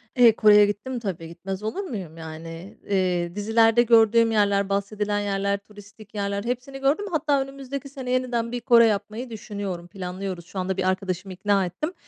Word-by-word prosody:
Eee, 235 -3 +6
Kore'ye 210 -1 +7
gittim 225 +5 -3
tabii, 180 -7 -5
gitmez 190 +4 -6
olur 295 - -3
muyum, 190 - -6
yani, 165 +3 -9
eee, 180 -3 0
dizilerde 225 +3 +4
gördüğüm 230 0 +5
yerler, 200 -2 +2
bahsedilen 205 +1 -1
yerler, 200 0 0
turistik 205 +1 -16
yerler, 200 0 -2
hepsini 250 +3 -4
gördüm. 280 +9 +1
Hatta, 295 -3 +1
önümüzdeki 275 +1 -6
sene, 265 -2 -6
yeniden, 245 -2 0
bir 245 0 -3
Kore 235 -1 +6
yapmayı 215 +3 -2
düşünüyorum, 200 -5 -6
planlıyoruz 185 -1 -6
şu 190 - -7
anda, 185 +1 -2
bir 190 - 0
arkadaşımı 185 0 -3
ikna 195 +1 +1
ettim. 305 - -4
205 Hz, 165 wpm, -24 LUFS, 190-240 Hz, -, Kore'ye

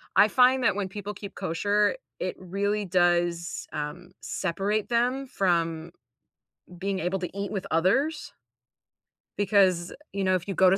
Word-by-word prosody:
I 210 - +7
find 255 +2 +4
that - - +3
when 195 -2 -2
people 205 +1 -6
keep 200 0 -9
kosher, 205 - +1 0.2
it - - -2
really 200 +3 -1
does, 175 -1 +1
um, 155 +4 -5
separate 200 +4 -1
them 250 +3 +1
from 170 -5 0 0.9
being 195 0 -1
able 180 +2 -1
to 180 +2 -6
eat 200 0 -3
with 195 -4 -3
others. 265 - +1 1.1
Because, 190 -4 +3 0.2
you 200 -1 -1
know, 185 0 +3
if 185 +2 -3
you 195 - -2
go 185 -1 +6
to 195 - +3
195 Hz, 150 wpm, -27 LUFS, 175-205 Hz, 1.1 s, I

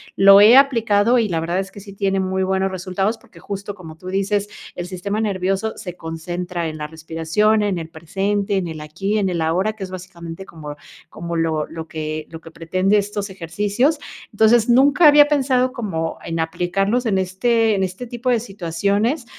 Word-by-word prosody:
lo 195 +1 +8
he 220 +4 +8
aplicado 235 -4 +4
y 225 - +2
la 170 -4 -1
verdad 170 +3 -1
es 195 0 -4
que 200 - -11
sí 200 0 -11
tiene 195 -1 0
muy 190 0 -1
buenos 190 0 0
resultados, 190 +4 -2
porque - - -19
justo, 200 0 -6
como 160 -5 -11
tú 180 - -12
dices, 200 +2 0 0.3
el 175 - -4
sistema 200 +3 -3
nervioso 195 0 -1
se 180 -4 -7
concentra 175 +1 -4
en 155 - -6
la 150 - -4
respiración, 165 +7 0
en 200 -3 0
el 165 -1 -7
presente, 195 +5 -2
en 180 -3 -1
el 160 -1 -6
aquí, 195 +8 -2
en 195 -2 +1
el 170 -2 -2
ahora, 180 +7 +1
que 215 -2 -8
es 190 - -6
básicamente 175 -1 -8
como 150 -4 -9 0.3
como 170 0 -6
lo 160 -2 0
lo 160 0 -8
que 155 0 -5
lo 160 0 -10
que 165 - -13
pretende 185 +5 +1
estos 205 0 -2
ejercicios. 205 - 0 0.3
Entonces, 220 +2 +4
nunca 285 +6 +6
había 295 0 +7
pensado 260 -3 +2
como 185 -10 -3
en 165 0 -4
aplicarlos 195 +8 0
en 195 -3 +1
este 220 +4 +1
en 195 - 0
este 185 +6 -4
tipo 240 +2 -4
de 240 -2 +3
situaciones, 200 - -1
195 Hz, 190 wpm, -20 LUFS, 170-215 Hz, 0.3 s, lo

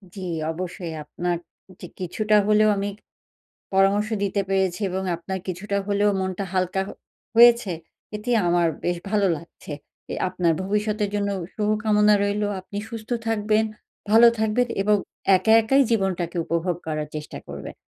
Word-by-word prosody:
জি, 195 - -7 0.3
অবশ্যই 175 0 -5
আপনার 175 +3 -2 0.4
য - - -14 0.2
কিছুটা 210 +4 0
হলেও 215 0 +5
আমি 200 +1 -1 0.8
পরামর্শ 195 +2 +3
দিতে 200 0 0
পেরেছি 190 0 0
এবং 190 +1 -2
আপনার 190 +3 -5
কিছুটা 190 +3 -3
হলেও 205 0 +2
মনটা 190 +1 -2
হালকা 185 0 0
হ - - -6 0.5
হয়েছে। 235 -4 +7 0.4
এটি 210 +4 -4 0.2
আমার 175 0 +3 0.2
বেশ 175 0 0
ভালো 205 -2 +2
লাগছে। 165 -1 -11 0.4
অ্যা - - -4
আপনার 180 -2 +1
ভবিষ্যতের 210 +1 -1
জন্য 200 -1 0 0.3
শুভ 210 -1 0
কামনা 210 0 +4
রইলো। 205 +1 0
আপনি 200 +2 -7
সুস্থ 225 0 -8 0.2
থাকবেন, 215 0 +2 0.5
ভালো 230 +2 +8
থাকবেন 220 +3 +1 0.2
এবং 210 +1 +4 0.4
একা 220 +4 +2
একাই 270 +5 +4
জীবনটাকে 185 -5 0
উপভোগ 170 +1 -1
করার 155 -1 -3
চেষ্টা 150 0 -7
করবেন। - - -8
200 Hz, 145 wpm, -24 LUFS, 180-215 Hz, 0.8 s, ভালো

